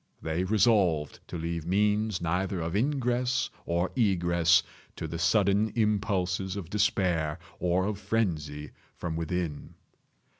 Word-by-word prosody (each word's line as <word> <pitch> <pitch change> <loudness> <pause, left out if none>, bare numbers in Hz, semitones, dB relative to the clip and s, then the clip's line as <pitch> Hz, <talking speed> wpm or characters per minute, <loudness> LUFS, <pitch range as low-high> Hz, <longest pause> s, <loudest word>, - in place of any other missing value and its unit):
They 80 +3 -2
resolved 95 - +2
to - - -5
leave 85 0 -3
means 105 +1 +1
neither 90 +3 -1
of 80 +2 -3
ingress 125 0 0 0.2
or 85 +2 0
egress 85 -6 +3 0.3
to 80 - -5
the 85 +1 -5
sudden 100 +5 +3
impulses 100 -4 0
of 95 -4 -6
despair 90 -6 +1 0.2
or 90 +1 +1
of 105 -1 -2
frenzy 75 -10 -2 0.2
from 85 -2 -4
within. 85 -2 -3
90 Hz, 120 wpm, -28 LUFS, 85-105 Hz, 0.3 s, egress